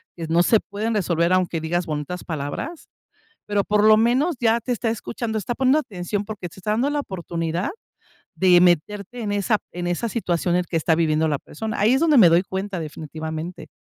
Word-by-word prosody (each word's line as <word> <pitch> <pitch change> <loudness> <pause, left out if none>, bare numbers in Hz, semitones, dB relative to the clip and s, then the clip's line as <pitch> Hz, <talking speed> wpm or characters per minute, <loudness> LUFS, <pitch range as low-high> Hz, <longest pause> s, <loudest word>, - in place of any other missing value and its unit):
que 165 - -5
no 165 +2 +3
se 220 +2 +4
pueden 215 +3 -3
resolver 170 -3 +1
aunque 180 -3 +1
digas 175 +2 -1
bonitas 155 +2 -4
palabras, 160 - -5 0.6
pero 205 -1 +1
por 210 +1 +2
lo 215 0 +8
menos, 255 +9 +2
ya 230 0 +3
te 250 - -4
está 230 0 -1
escuchando, 225 0 -3
está 225 +4 -3
poniendo 265 +4 +3
atención 200 - -4
porque 205 -4 -6
se 190 - -14
está 210 +3 -2
dando 240 +6 +1
la 290 0 -1
oportunidad 170 - -3 0.7
de 180 -2 +5
meterte 200 +6 +1
en 210 -2 -2
esa 205 +2 +1 0.2
en 175 0 -4
esa 175 +7 -1
situación 175 -5 0
en 180 - +2
que 165 - 0
está 160 +1 +2
viviendo 160 -1 +2
la 145 -2 0
persona. 220 +6 -6
Ahí 225 +5 +4
es - - +2
donde 315 -4 +4
me 190 -8 +8
doy 170 +3 +4
cuenta, 190 0 -4
definitivamente. 160 +1 -6
185 Hz, 200 wpm, -23 LUFS, 170-220 Hz, 0.7 s, lo